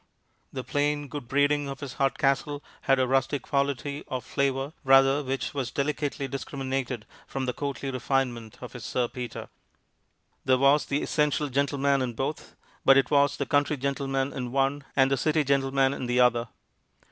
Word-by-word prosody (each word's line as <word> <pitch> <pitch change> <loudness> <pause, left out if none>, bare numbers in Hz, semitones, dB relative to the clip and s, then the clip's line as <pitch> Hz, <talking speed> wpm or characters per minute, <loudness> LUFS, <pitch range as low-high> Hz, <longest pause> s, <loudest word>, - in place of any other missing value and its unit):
The 130 - -5
plain 145 +2 0
good 140 -2 -7
breeding 145 +1 +2
of 135 - -6
his 140 -4 -6
Hardcastle 140 +1 +1 0.3
had 135 - +6
a 130 - +3
rustic 135 +2 0
quality, 140 0 -1
or 130 -2 -2
flavor, 135 +2 -1
rather, 135 +1 +5
which 135 +1 -3
was 135 -4 -2
delicately 145 -1 -2
discriminated 135 -3 -4 0.2
from 135 -1 -3
the 125 - -1
courtly 140 0 -4
refinement 125 -3 -2
of 125 - -8
his 125 - -8
Sir 125 -1 0
Peter. 125 0 -6 1.0
There 130 0 +3
was 140 +3 +4
the 140 +1 0
essential 150 -1 +1
gentleman 140 0 +1
in 125 -2 -2
both, 135 +6 -4 0.3
but 135 0 +7
it 135 - +2
was 145 0 +3
the 140 - -1
country 145 +2 +1
gentleman 135 0 -1
in 125 -2 -4
one 135 +1 0
and 135 0 +4
the 135 - +2
city 155 +3 +2
gentleman 135 -1 +2
in 130 - -4
the 125 +1 +1
other. 120 -1 +3
135 Hz, 170 wpm, -27 LUFS, 130-140 Hz, 1.0 s, but